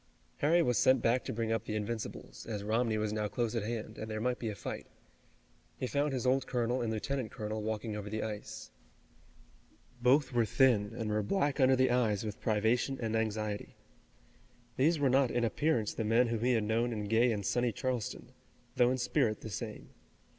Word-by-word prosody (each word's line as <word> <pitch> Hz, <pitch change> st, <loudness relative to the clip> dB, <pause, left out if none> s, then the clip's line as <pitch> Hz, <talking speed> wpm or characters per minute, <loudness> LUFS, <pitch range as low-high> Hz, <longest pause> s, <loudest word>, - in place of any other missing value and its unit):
Harry 170 Hz, +4 st, +3 dB
was 125 Hz, -4 st, +2 dB
sent 130 Hz, 0 st, +5 dB
back 120 Hz, +2 st, +2 dB
to -, -, -4 dB
bring 115 Hz, 0 st, -2 dB
up 115 Hz, -, -1 dB
the 110 Hz, -, -3 dB
Invincibles, 110 Hz, +1 st, -5 dB
as 105 Hz, -3 st, -4 dB
Romney 110 Hz, +1 st, +1 dB
was 105 Hz, 0 st, -1 dB
now 105 Hz, -1 st, -1 dB
close 115 Hz, +1 st, -2 dB
at 115 Hz, -, 0 dB
hand, 110 Hz, 0 st, -5 dB
and 110 Hz, -, -5 dB
there 110 Hz, 0 st, -3 dB
might 125 Hz, +2 st, -1 dB
be 115 Hz, -, -2 dB
a 105 Hz, -, -4 dB
fight. 90 Hz, -, -6 dB, 0.9 s
He -, -, -2 dB
found 145 Hz, +3 st, 0 dB
his 130 Hz, -1 st, -2 dB
old 130 Hz, +1 st, +2 dB
colonel 120 Hz, 0 st, 0 dB
and 115 Hz, -2 st, -1 dB
lieutenant 125 Hz, +2 st, -2 dB
colonel 110 Hz, 0 st, -4 dB
walking 110 Hz, 0 st, -3 dB
over 105 Hz, -1 st, -5 dB
the 110 Hz, +1 st, -2 dB
ice. 110 Hz, 0 st, -6 dB, 1.3 s
Both 130 Hz, +3 st, +3 dB
were 120 Hz, -1 st, +3 dB
thin, 110 Hz, -4 st, +3 dB
and 110 Hz, -2 st, -2 dB
were 105 Hz, 0 st, +1 dB
black 145 Hz, -, 0 dB
under 130 Hz, 0 st, +5 dB
the 130 Hz, -1 st, +3 dB
eyes 110 Hz, -4 st, +1 dB
with 105 Hz, -1 st, -6 dB
privation 115 Hz, +5 st, +1 dB
and 115 Hz, -2 st, -2 dB
anxiety. 110 Hz, -2 st, -2 dB, 1.0 s
These 155 Hz, +6 st, +3 dB
were 145 Hz, -2 st, +2 dB
not 130 Hz, 0 st, +4 dB
in 120 Hz, 0 st, 0 dB
appearance 115 Hz, -2 st, +1 dB
the 115 Hz, -, -2 dB
men 115 Hz, +3 st, +3 dB
whom 115 Hz, -1 st, -2 dB
he 125 Hz, +1 st, +3 dB
had 110 Hz, -2 st, +2 dB
known 115 Hz, +3 st, +1 dB
in 105 Hz, -1 st, -3 dB
gay 115 Hz, +4 st, +3 dB
and 105 Hz, -3 st, -2 dB
sunny 120 Hz, +3 st, +1 dB
Charleston, 125 Hz, 0 st, -3 dB, 0.5 s
though 120 Hz, 0 st, +5 dB
in 130 Hz, -, 0 dB
spirit 125 Hz, -3 st, 0 dB
the 110 Hz, -, -7 dB
same. -, -, -6 dB
115 Hz, 200 wpm, -32 LUFS, 110-125 Hz, 1.3 s, sent